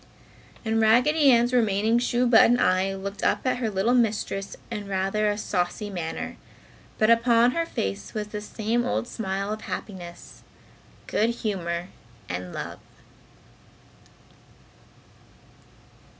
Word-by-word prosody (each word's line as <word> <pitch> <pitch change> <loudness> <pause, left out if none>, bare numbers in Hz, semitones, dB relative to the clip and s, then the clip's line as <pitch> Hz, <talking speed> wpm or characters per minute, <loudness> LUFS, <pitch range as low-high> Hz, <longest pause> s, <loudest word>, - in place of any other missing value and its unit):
And 225 0 +1
Raggedy 270 +7 +4
Ann's 240 0 +4
remaining 220 -1 +2
shoe 245 0 +1
button 240 0 +6
eye 185 +1 +2
looked 200 +1 -6
up - - +1
at 255 - +1
her 240 -3 -1
little 205 +4 +1
mistress 210 -4 0
in 210 -3 -5
rather 195 +2 0
a 205 - -1
saucy 205 +1 -2
manner, 170 -4 -5 0.6
but 215 +1 +4
upon 235 +1 +4
her 335 +4 -1
face 100 - -4
was 210 -1 -3
the 210 0 -5
same 225 +3 -1
old 245 -1 -1
smile 200 -2 -3
of 215 - -7
happiness, 175 -6 -8 0.6
good 220 +2 +1
humor 185 -7 -3 0.4
and 90 0 -5
love. - - -6
215 Hz, 120 wpm, -25 LUFS, 195-235 Hz, 0.6 s, button